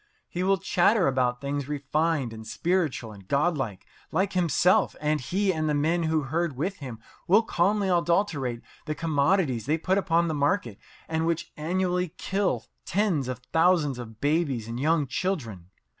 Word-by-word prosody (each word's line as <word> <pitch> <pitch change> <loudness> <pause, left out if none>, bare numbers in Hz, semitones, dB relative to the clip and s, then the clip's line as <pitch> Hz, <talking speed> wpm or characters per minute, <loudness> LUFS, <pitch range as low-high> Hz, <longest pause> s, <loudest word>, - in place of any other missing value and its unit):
He 175 - -4
will 195 +1 +3
chatter 185 +3 +3
about 125 -2 +1
things 140 0 -3
refined 145 -2 -1
and 110 0 -9
spiritual 160 -5 -1
and 100 -3 -14
godlike 140 - 0 0.3
like 190 +4 0
himself, 180 0 +3
and 150 0 0
he 190 +8 0
and 155 -1 -1
the 150 - +1
men 160 +4 +1
who 160 -1 +1
herd 155 0 -2
with 185 +8 -2
him 130 -6 -7 0.3
will 205 +6 +5
calmly 200 +1 +1
adulterate 170 - +1 0.2
the 155 - -2
commodities 145 - +1
they 155 +2 +2
put 185 +4 +1
upon 170 -3 +2
the 160 - -1
market 145 - 0 0.3
and 160 0 -1
which 165 -1 -2
annually 180 +2 -1
kill 195 0 -1 0.2
tens 175 -9 0
of 125 -1 -4
thousands 160 -6 +3
of 115 -2 -9
babies 145 -6 0
and 115 +1 -5
young 155 +1 +2
children. 125 - -3
155 Hz, 160 wpm, -26 LUFS, 135-180 Hz, 0.3 s, will